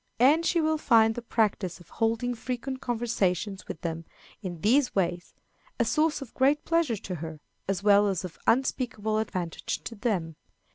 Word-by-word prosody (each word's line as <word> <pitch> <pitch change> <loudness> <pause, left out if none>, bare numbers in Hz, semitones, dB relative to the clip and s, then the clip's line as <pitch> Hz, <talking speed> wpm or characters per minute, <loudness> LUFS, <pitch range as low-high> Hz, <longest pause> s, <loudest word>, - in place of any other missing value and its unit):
And 290 +7 +5
she 335 +1 +2
will 315 -1 +1
find 225 -5 +5
the 240 - -5
practice 210 -6 0
of 175 -2 -17
holding 230 +2 0
frequent 255 +2 -4
conversations 210 -5 -1
with 160 - -7
them, 165 -1 -3 0.4
in 175 -5 -6
these 250 - +3
ways, 175 -2 -1 0.4
a 235 - +3
source 305 +5 +1
of 245 - -15
great 280 +3 +2
pleasure 330 -9 +1
to 185 -1 -6
her, 160 -2 -6 0.3
as 195 -1 -1
well 205 0 +6
as 190 -2 -1
of 175 - -9
unspeakable 230 -4 +1
advantage 180 -6 -3
to - - -6
them. 195 -9 -2
220 Hz, 170 wpm, -28 LUFS, 185-255 Hz, 0.4 s, well